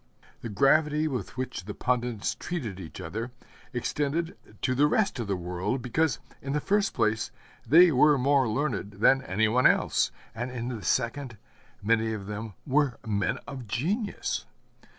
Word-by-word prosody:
The 115 - -5
gravity 150 +7 +3
with 130 -4 -4
which 130 -7 -4
the 105 - -6
pundits 120 -3 -1
treated 120 - -5
each 85 -4 -9
other 115 +4 -4 0.4
extended 150 +7 -1 0.3
to 130 - +2
the 145 +3 +4
rest 195 - +1
of 115 - -3
the 100 - 0
world, 90 +8 -3
because, 130 0 +1 0.2
in 135 +1 -3
the 150 - +1
first 200 +5 +1
place, 110 -2 +1 0.4
they 170 +7 +8
were 145 +2 +5
more 135 0 +3
learned 110 -5 -1
than 125 +7 +4
any 110 -1 +1
one 125 +4 +5
else, - - +2 0.2
and 120 +3 -4
in 125 -1 -4
the 115 -4 -5
second, 115 +2 -1 0.5
many 110 +1 +2
of 100 -3 -5
them 105 0 -6
were 140 -3 +2
men 100 -3 0
of 130 -4 -7
genius. 195 - -2
125 Hz, 160 wpm, -28 LUFS, 110-145 Hz, 0.5 s, they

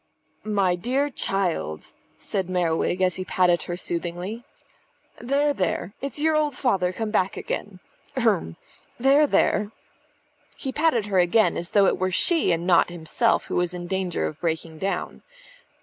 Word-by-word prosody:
"My 200 -3 +1
dear 260 +10 -1
child," 175 - -1 0.2
said 190 -3 -3
Merriwig 175 0 0
as 180 -1 +2
he 185 - -3
patted 180 -2 +2
her 175 - -3
soothingly. 175 +6 -4 0.8
"There, 280 +4 +1
there! 185 -2 -2
It's 275 +2 -5
your 315 +1 +2
old 300 -3 +1
father 190 -9 +1
come 215 +3 -4
back 195 -3 0
again. 195 -3 -5 0.4
H'r'm. 205 - +1 0.4
There, 275 +4 +5
there!" 210 -6 +1 0.9
He 265 - -4
patted 295 -7 +1
her 195 -3 +1
again, 180 +5 +3
as 175 - -4
though 200 -2 +4
it - - +1
were 185 0 +1
she 325 - +4
and 170 0 -1
not 175 -2 +4
himself 175 +7 0
who - - -3
was 180 0 0
in 175 0 -6
danger 185 -1 -2
of 155 - -5
breaking 160 -1 -3
down. 195 +2 -3
190 Hz, 155 wpm, -24 LUFS, 175-235 Hz, 0.9 s, There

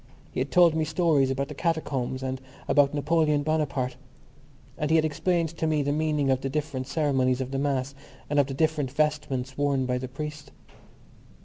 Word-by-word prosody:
He - - -4
had 130 +2 -1
told 175 -2 +5
me 160 0 +1
stories 155 -5 +2
about 135 +1 -1
the - - -7
catacombs 135 -6 -2
and 130 0 -3 0.3
about 145 -1 +4
Napoleon 150 0 +2
Bonaparte, 140 -5 -1 0.8
and 150 -2 -2
he 160 - +4
had 160 -1 +4
explained 165 +2 0
to 160 0 -3
me 155 -2 +1
the 145 - 0
meaning 150 -2 +1
of 130 0 +1
the 135 - -2
different 140 -3 -3
ceremonies 135 -5 +1
of 130 0 -3
the 135 - -1
Mass 140 -1 -1 0.3
and 145 0 +1
of 140 - +3
the 135 - -5
different 155 -2 +1
vestments 140 -2 -1
worn 140 -2 +1
by 125 0 -1
the 130 - -5
priest. 145 +1 -7
145 Hz, 190 wpm, -26 LUFS, 135-155 Hz, 0.8 s, told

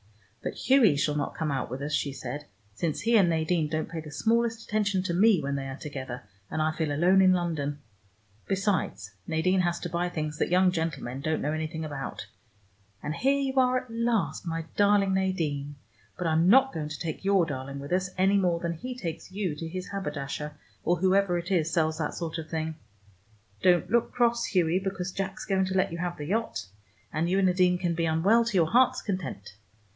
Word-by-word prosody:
"But - - -3
Hughie 255 - +4
shall 145 +1 +1
not 145 -1 -2
come 160 -2 -1
out 135 - -2
with 130 +3 -5
us," 150 +1 -3
she 140 - 0
said, 135 +2 -6 0.3
"since 155 +8 -2
he 230 +1 +2
and 195 -5 +5
Nadine 160 0 +1
don't 155 +1 -2
pay 165 0 -5
the 155 -1 -8
smallest 225 +7 +1
attention 205 -4 0
to 175 - -2
me, 200 +1 +5
when 140 -1 -2
they 135 -1 -3
are 135 0 -6
together, 130 -5 -6 0.3
and 155 - -3
I 155 0 +2
feel 155 -1 -2
alone 180 +6 +4
in 185 -1 +6
London. 160 -5 -1 0.7
Besides, 195 - -1
Nadine 175 +4 +2
has 175 -1 +1
to 175 - -4
buy 175 +1 -1
things 155 -3 -4
that - - +1
young 180 +1 +4
gentlemen 160 -7 -3
don't 155 +2 -1
know 150 - 0
anything 160 0 -3
about 145 -3 -5 0.8
and 150 - -2
here 270 - +2
you 270 -1 -1
are 255 -1 +4
at 250 - -16
last, 230 -6 0
my 165 -1 -3
darling 205 -1 +4
Nadine, 155 -7 -1 0.4
but 180 - -3
I'm 165 +2 +3
not 265 +4 +6
going 150 -2 -3
to 150 - -6
take 165 +1 -4
your 195 -3 +4
darling 140 -2 -5
with 140 +2 -8
us, 185 0 +1
any 195 +2 +4
more 175 -3 +2
than 170 0 -2
he 250 +10 -6
takes 170 -5 -6
you 190 -4 -2
to 165 +2 -5
his 185 +2 -5
haberdasher, 150 -5 -4 0.3
or 175 - +3
whoever 190 0 +2
it 175 +2 -5
is 165 -3 +2
sells 160 -1 +1
that 150 - -2
sort 165 -1 -4
of 160 -1 -7
thing. 160 -1 -2 0.9
Don't 180 +1 +3
look 235 0 +2
cross, 235 -1 +2
Hughie, 175 -1 +2
because 190 -1 -3
Jack's 195 +1 -4
going 190 -1 +1
to 190 0 -1
let 185 - +2
you 170 - -5
have 175 0 -3
the 150 - -5
yacht, 185 - -2 0.5
and 160 +3 0
you 190 - +2
and 195 - +3
Nadine 180 -1 +3
can 175 -1 -1
be 165 0 0
unwell 190 +9 +4
to 220 -4 0
your 165 -2 +3
heart's 255 +2 +4
content. 180 - -4
175 Hz, 210 wpm, -28 LUFS, 155-195 Hz, 0.9 s, in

